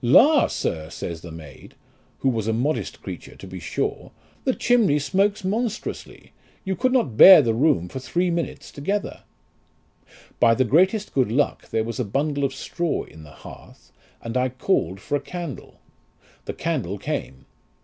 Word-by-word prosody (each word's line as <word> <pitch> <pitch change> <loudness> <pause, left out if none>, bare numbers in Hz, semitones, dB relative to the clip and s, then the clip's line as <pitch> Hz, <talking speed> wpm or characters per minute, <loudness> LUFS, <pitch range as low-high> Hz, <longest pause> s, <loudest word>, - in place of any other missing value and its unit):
La! 275 - +6
sir, 80 -1 -3
says 85 -2 -6
the 85 - -9
maid, 80 -4 -12 0.5
who 135 - +3
was 110 -4 -2
a 115 - +1
modest 135 +7 -2
creature - - -8
to - - -11
be - - -8
sure, - - -3 0.3
the 260 - +1
chimney 230 -12 +3
smokes 195 +7 0
monstrously; 220 +3 -4 0.3
you 190 0 -1
could 255 +4 +1
not 235 - +1
bear 190 +6 +11
the 115 -2 +1
room 125 - +2
for 130 - -6
three 175 +7 -1
minutes 170 -1 -4
together. 195 +8 -3 1.2
By 115 -1 +5
the 130 - +2
greatest 190 - +2
good 130 -5 +1
luck 140 +5 0
there 110 - 0
was 115 +3 -5
a - - +1
bundle 140 +6 -1
of 135 -1 -1
straw 170 +4 -2
in 80 - -14
the 75 - -13 0.2
hearth, - - -13 0.3
and 115 +1 -5
I 130 0 +2
called 125 - -1
for 145 - -3
a 145 - -1
candle. 175 -5 -8 0.7
The - - -4
candle 130 - -2
came. 65 -7 -5
140 Hz, 170 wpm, -23 LUFS, 115-185 Hz, 1.2 s, bear